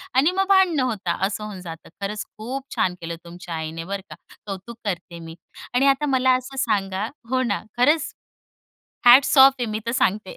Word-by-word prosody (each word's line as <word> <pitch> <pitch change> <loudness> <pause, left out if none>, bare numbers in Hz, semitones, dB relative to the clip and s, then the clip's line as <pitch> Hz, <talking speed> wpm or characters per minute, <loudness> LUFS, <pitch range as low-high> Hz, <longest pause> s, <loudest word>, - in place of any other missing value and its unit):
आणि 280 +6 +4
मग 385 +1 0
भांडणं 365 -8 +4
होता, 200 -8 -2
असं 210 +1 -5
होऊन 205 -3 -7
जातं. 165 -2 -10
खरंच 210 +1 -3
खूप 255 +5 -5
छान 180 - +1
केलं 170 0 -5
तुमच्या 170 0 -8
आईने 160 +1 -5
बरं 195 +2 -4
का. - - -9 0.3
कौतुक 200 +3 -7
करते 175 -3 -4
मी. 165 0 -10 0.4
आणि 270 +3 +3
आता 275 +2 +3
मला 260 -2 +3
असं 255 +2 -6
सांगा 195 -2 0 0.2
हो 260 0 +1
ना, 210 -5 -1 0.2
खरंच 295 +5 +2 0.9
हॅट्स 255 +4 +7
ऑफ 270 +1 +9
आहे 245 - -1
मी 215 - -2
तर - - 0
सांगते. 205 -5 0
215 Hz, 185 wpm, -23 LUFS, 185-265 Hz, 0.9 s, ऑफ